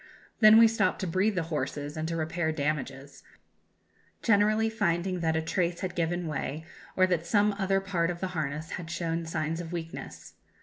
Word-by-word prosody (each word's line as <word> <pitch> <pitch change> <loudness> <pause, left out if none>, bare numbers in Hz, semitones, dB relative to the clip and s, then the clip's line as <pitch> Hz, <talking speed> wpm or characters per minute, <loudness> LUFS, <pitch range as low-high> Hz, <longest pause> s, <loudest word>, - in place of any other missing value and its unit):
Then 215 0 +8
we 230 0 +8
stopped 225 0 +1
to - - -1
breathe 190 +5 +1
the 175 - 0
horses 145 +1 -3
and 160 0 -3
to 165 - -2
repair 160 0 -1
damages, 140 -2 -3 1.0
generally 215 0 +3
finding 185 -4 0
that 160 -1 0
a 160 - 0
trace 170 0 -1
had 185 -2 -3
given 175 +1 -1
way, 155 0 -4 0.3
or 185 - +6
that 175 -2 -1
some 205 +2 +3
other 195 0 +2
part 180 -3 -1
of 175 -1 -4
the 190 - -2
harness 155 -2 -4
had 170 -2 -6
shown 165 -1 -2
signs 160 +1 -2
of 165 -1 -8
weakness. 85 - -7
170 Hz, 180 wpm, -28 LUFS, 155-190 Hz, 1.0 s, Then